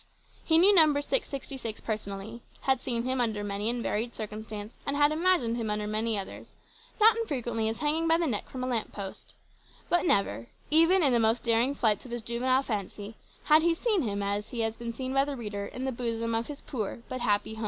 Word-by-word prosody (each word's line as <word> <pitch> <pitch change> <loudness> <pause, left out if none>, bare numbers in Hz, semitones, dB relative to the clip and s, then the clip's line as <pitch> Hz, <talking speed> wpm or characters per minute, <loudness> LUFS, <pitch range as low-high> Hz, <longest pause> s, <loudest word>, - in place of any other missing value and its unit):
He 320 - +3
knew 380 +5 +7
Number 310 -5 +5
666 275 - -3
personally; 215 +1 -5 0.2
had 265 -2 +1
seen 235 -2 -1
him 255 0 0
under 220 -3 0
many 205 +2 -1
and 240 0 -1
varied 230 +3 -2
circumstance, 215 0 -6
and 280 +1 -2
had 290 0 +4
imagined 315 -8 +2
him 225 -2 -2
under 210 0 -1
many 215 +1 0
others 195 - -8 0.4
not 440 +2 +7
unfrequently 240 - -1
as 225 - -4
hanging 310 +2 +1
by 325 0 +4
the 340 - 0
neck 230 -9 -2
from 255 -1 -5
a - - -1
lamp 235 -3 -1
post 195 -2 -8 0.5
but 350 - +3
never, 115 - +1 0.2
even 330 +4 +5
in 275 -4 +4
the 240 - +4
most 225 +1 +2
daring 235 +4 +2
flights 220 -6 +1
of - - -10
his 240 -1 -5
juvenile 255 +3 +1
fancy, 205 -2 -5 0.3
had 310 +1 +6
he 335 +1 +2
seen 425 0 +1
him 200 -5 -2
as 200 +1 -2
he 235 - -3
has 225 0 -1
been 235 0 -5
seen 260 +2 -4
by 270 0 +4
the 280 -1 -4
reader 205 -3 -4
in 255 +5 -6
the 265 - 0
bosom 230 -1 -2
of 225 +1 -1
his 295 -1 -8
poor 230 -2 -5
but 255 -1 -5
happy 205 -1 +1
home. 220 - -9
235 Hz, 215 wpm, -28 LUFS, 215-280 Hz, 0.5 s, knew